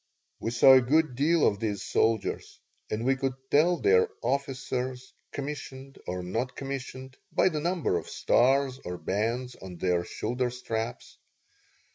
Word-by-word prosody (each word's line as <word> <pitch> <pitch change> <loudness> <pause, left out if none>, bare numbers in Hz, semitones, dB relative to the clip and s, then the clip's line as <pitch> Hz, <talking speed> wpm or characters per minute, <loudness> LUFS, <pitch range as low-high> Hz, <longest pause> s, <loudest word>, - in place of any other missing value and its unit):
We - - -2
saw 120 +3 +7
a 130 - +7
good 150 +3 +2
deal 150 +5 +3
of 100 - +2
these 105 -3 -2
soldiers, 110 -2 0 0.3
and 110 +2 -2
we 135 +1 +3
could 130 -1 -2 0.2
tell 170 +4 +4
their 455 +2 +4
officers, 130 -2 -2 0.2
commissioned 135 -1 -7
or 90 0 -3
non 115 +8 -1
commissioned, 130 0 -7
by - - +3
the 155 -4 -2
number 170 - 0
of 80 - -11
stars 135 +1 +2
or 90 0 -5
bands 115 +9 -2
on 90 -2 -9
their 90 0 +1
shoulder 125 +7 -2
straps. 115 -2 -5
130 Hz, 145 wpm, -28 LUFS, 110-140 Hz, 0.3 s, saw